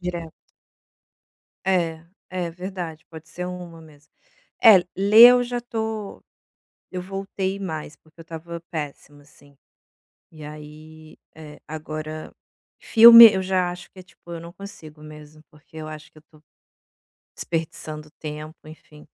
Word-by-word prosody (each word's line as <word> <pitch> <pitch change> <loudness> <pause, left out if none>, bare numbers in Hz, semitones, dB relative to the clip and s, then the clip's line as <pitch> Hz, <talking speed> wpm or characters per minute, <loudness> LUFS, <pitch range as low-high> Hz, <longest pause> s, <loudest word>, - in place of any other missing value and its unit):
Direto. 170 -3 -6 1.3
É, 165 -4 0 0.3
é 180 -2 -4
verdade, 175 -2 -7
pode 160 0 -12
ser 180 +2 -6
uma 180 -2 -9
mesmo. 150 -2 -19 0.5
É, 220 -4 +9 0.2
ler 210 +5 +8
eu 250 0 +3
já 245 0 -4
tô 220 -3 -5 0.7
eu 180 - -5
voltei 195 0 -4
mais, 160 -5 -6
porque 160 +1 -28
eu 165 - -10
estava 165 +1 -8
péssima, 145 -2 -7
assim, 145 -1 -21 0.7
e 155 -2 -14
aí, 155 +1 -13 0.2
eh, 150 -1 -12
agora 155 0 -7 0.5
filme 230 0 +10
eu 190 - -1
já 185 -1 0
acho 175 0 -11
que, 190 - -16
é - - -11
tipo, 180 - -22
eu 165 - -7
não 170 0 -11
consigo 165 -6 -12
mesmo, 155 0 -13
porque 150 +1 -18
eu 155 0 -7
acho 155 0 -11
que - - -24
eu 155 - -16
tô 155 -1 -22 1.0
desperdiçando 155 -2 -5
tempo, 155 +1 -8
enfim. 155 -1 -15
165 Hz, 140 wpm, -23 LUFS, 155-185 Hz, 1.3 s, filme